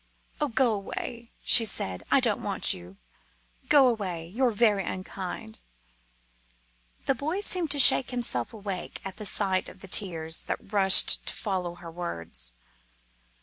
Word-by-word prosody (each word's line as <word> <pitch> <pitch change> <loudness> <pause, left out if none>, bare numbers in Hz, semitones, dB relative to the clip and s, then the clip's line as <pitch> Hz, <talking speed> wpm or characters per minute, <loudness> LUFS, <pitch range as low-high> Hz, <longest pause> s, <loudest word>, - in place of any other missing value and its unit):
"Oh! 295 - +2
go 245 -2 +2
away!" 230 +3 -6
she 235 - +5
said. 95 - -1
"I - - +4
don't - - +1
want - - +1
you! 90 +2 -12 0.7
Go 280 -3 +6
away; 190 -8 -2
you're 250 +6 +1
very 210 -3 +2
unkind!" 190 +4 -7 1.5
The - - +2
boy 310 +9 -3
seemed 360 -5 +1
to 285 - +1
shake 265 -1 +9
himself 235 - -2
awake 200 -4 -6
at 195 - -7
the 210 - -5
sight 190 -2 0
of - - -15
the 195 - -9
tears 165 -5 0
that 205 - -6
rushed 195 -2 +3
to - - -2
follow 180 -4 -3
her 175 -1 -11
words. 85 - -6
200 Hz, 145 wpm, -27 LUFS, 175-235 Hz, 1.5 s, shake